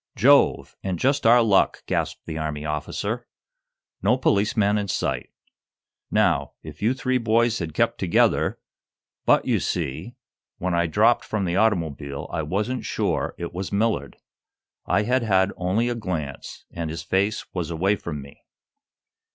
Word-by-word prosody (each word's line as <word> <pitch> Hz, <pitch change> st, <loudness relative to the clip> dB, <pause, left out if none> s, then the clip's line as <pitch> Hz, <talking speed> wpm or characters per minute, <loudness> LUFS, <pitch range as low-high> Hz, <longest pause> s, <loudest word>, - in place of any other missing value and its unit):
"Jove! 140 Hz, +6 st, +4 dB
and 95 Hz, -2 st, -2 dB
just 135 Hz, -, +2 dB
our 120 Hz, +1 st, +7 dB
luck!" 100 Hz, -4 st, +2 dB
gasped -, -, -2 dB
the 80 Hz, -1 st, -5 dB
Army 75 Hz, -1 st, -3 dB
officer. 75 Hz, -1 st, -3 dB, 0.7 s
"No 110 Hz, +7 st, +3 dB
policeman 105 Hz, -3 st, +2 dB
in 100 Hz, -, -3 dB
sight! -, -, -2 dB, 0.8 s
Now, -, -, +1 dB
if 75 Hz, -1 st, -10 dB
you 115 Hz, +5 st, +2 dB
three 130 Hz, -1 st, 0 dB
boys 115 Hz, 0 st, +2 dB
had 80 Hz, -4 st, -5 dB
kept -, -, +1 dB
together -, -, +2 dB, 0.3 s
" -, -, -67 dB
"But, -, -, +4 dB
you -, -, +2 dB
see, 70 Hz, -, -3 dB, 0.4 s
when 90 Hz, 0 st, -2 dB
I 85 Hz, 0 st, +2 dB
dropped 80 Hz, -, +3 dB
from 105 Hz, -3 st, -2 dB
the 85 Hz, 0 st, -1 dB
automobile, 80 Hz, -10 st, 0 dB
I 80 Hz, -, 0 dB
wasn't 105 Hz, +11 st, -2 dB
sure -, -, -1 dB
it 85 Hz, 0 st, -5 dB
was 95 Hz, +2 st, -4 dB
Millard. 100 Hz, -9 st, 0 dB, 0.7 s
I 105 Hz, -, +2 dB
had 130 Hz, +4 st, +1 dB
had 95 Hz, -3 st, +2 dB
only 95 Hz, +6 st, 0 dB
a 120 Hz, -, 0 dB
glance, 85 Hz, -, -5 dB
and 85 Hz, -2 st, -4 dB
his 80 Hz, -1 st, -5 dB
face 100 Hz, +3 st, 0 dB
was 90 Hz, -3 st, -3 dB
away 95 Hz, +5 st, +1 dB
from 75 Hz, -7 st, -6 dB
me." 70 Hz, -, -15 dB
95 Hz, 155 wpm, -24 LUFS, 80-115 Hz, 0.8 s, our